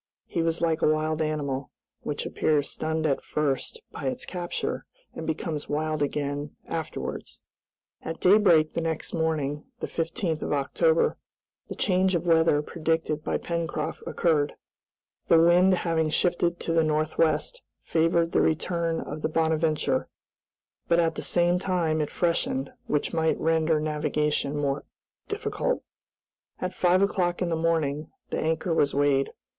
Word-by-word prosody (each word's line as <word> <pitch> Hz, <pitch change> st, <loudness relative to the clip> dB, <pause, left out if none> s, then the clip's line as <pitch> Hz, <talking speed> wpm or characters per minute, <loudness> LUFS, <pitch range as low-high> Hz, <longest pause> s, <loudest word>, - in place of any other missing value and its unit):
He 170 Hz, -, -2 dB
was 165 Hz, 0 st, 0 dB
like 165 Hz, -1 st, +1 dB
a -, -, +4 dB
wild 155 Hz, +1 st, 0 dB
animal, 145 Hz, -3 st, -2 dB, 0.3 s
which -, -, -3 dB
appears 145 Hz, -2 st, +1 dB
stunned 160 Hz, 0 st, -2 dB
at 140 Hz, -3 st, +1 dB
first 150 Hz, -, -1 dB
by -, -, -7 dB
its 255 Hz, -1 st, -3 dB
capture, 175 Hz, -2 st, -3 dB, 0.3 s
and 160 Hz, -, -6 dB
becomes 160 Hz, -1 st, -3 dB
wild 155 Hz, +1 st, -1 dB
again 145 Hz, 0 st, -2 dB
afterwards. -, -, -5 dB, 0.6 s
At 165 Hz, 0 st, -5 dB
daybreak 180 Hz, -6 st, +5 dB
the 170 Hz, -, -1 dB
next 160 Hz, -1 st, -3 dB
morning, 155 Hz, -3 st, -1 dB
the -, -, -2 dB
15th 165 Hz, -1 st, -2 dB
of -, -, -1 dB
October, 470 Hz, -, +2 dB, 0.5 s
the -, -, -5 dB
change 185 Hz, -1 st, +2 dB
of 170 Hz, 0 st, -1 dB
weather 160 Hz, -3 st, +4 dB
predicted 160 Hz, -1 st, -1 dB
by -, -, 0 dB
Pencroft 170 Hz, -1 st, -3 dB
occurred. 150 Hz, -4 st, +1 dB, 0.7 s
The 165 Hz, -, +6 dB
wind 175 Hz, +3 st, +5 dB
having 165 Hz, -3 st, 0 dB
shifted 175 Hz, +1 st, +1 dB
to 165 Hz, -, -1 dB
the 165 Hz, -1 st, +4 dB
northwest 155 Hz, -, +1 dB, 0.2 s
favored 165 Hz, +1 st, +2 dB
the -, -, +3 dB
return 165 Hz, +1 st, 0 dB
of 155 Hz, -, -6 dB
the 155 Hz, -, 0 dB
"Bonadventure," 160 Hz, -1 st, +1 dB, 0.8 s
but 170 Hz, -, +3 dB
at 165 Hz, -1 st, +3 dB
the -, -, -5 dB
same 175 Hz, 0 st, +2 dB
time 170 Hz, -5 st, 0 dB
it 150 Hz, -, -1 dB
freshened, 165 Hz, -5 st, -1 dB
which 150 Hz, +3 st, 0 dB
might 160 Hz, -1 st, +1 dB
render 160 Hz, -1 st, +2 dB
navigation 150 Hz, -1 st, 0 dB
more 140 Hz, -1 st, -1 dB, 0.4 s
difficult. 430 Hz, +4 st, -2 dB, 0.8 s
At 185 Hz, 0 st, -3 dB
five 185 Hz, +1 st, +3 dB
o'clock 180 Hz, -3 st, +1 dB
in 175 Hz, -, -1 dB
the 165 Hz, -, +1 dB
morning 160 Hz, -3 st, 0 dB, 0.2 s
the -, -, -1 dB
anchor 160 Hz, +2 st, 0 dB
was 145 Hz, -4 st, +2 dB
weighed. 140 Hz, -1 st, +2 dB
160 Hz, 145 wpm, -26 LUFS, 150-170 Hz, 0.8 s, The